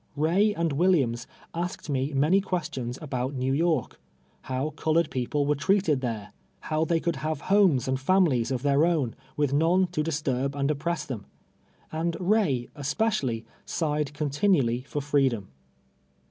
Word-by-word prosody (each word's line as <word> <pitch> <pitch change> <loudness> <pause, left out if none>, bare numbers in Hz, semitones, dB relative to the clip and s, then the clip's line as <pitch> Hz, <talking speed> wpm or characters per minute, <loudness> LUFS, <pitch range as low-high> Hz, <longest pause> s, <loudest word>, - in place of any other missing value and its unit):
Ray 175 +8 +3
and 170 -2 0
Yv^illiams 140 -8 +2 0.3
asked 175 0 -4
me 135 0 -1
many 150 +8 +3
rpiestions 150 -10 -3
about 130 -1 -3
ISTew 130 +1 0
York 165 +1 0 0.2
— - - -37
how 130 +4 -1
colored 160 +1 +1
people 135 +3 -1
were 145 - +3
treated 165 -2 +2
there; 110 -5 -4 0.3
how 155 0 0
they 165 +1 +1
could 170 0 -1
have 155 -2 -3
homes 185 - +4
and 130 0 0
families 140 -6 +3
of 130 -1 -2
their 140 +1 +3
own, 155 -9 +1 0.2
with 145 -2 +1
none 170 +6 +3
"^T" 175 - -11
to 180 - -1
disturb 140 -3 -1
and 140 +1 +1
oppress 170 +4 -2
them; 115 -7 -6 0.6
and 165 +1 -1
Ray, 180 - +1
especially, 145 - -1 0.2
sighed 150 -3 -1
continually 145 - +1
for 145 - -3
freedom. 135 -8 +1
150 Hz, 155 wpm, -27 LUFS, 130-170 Hz, 0.6 s, homes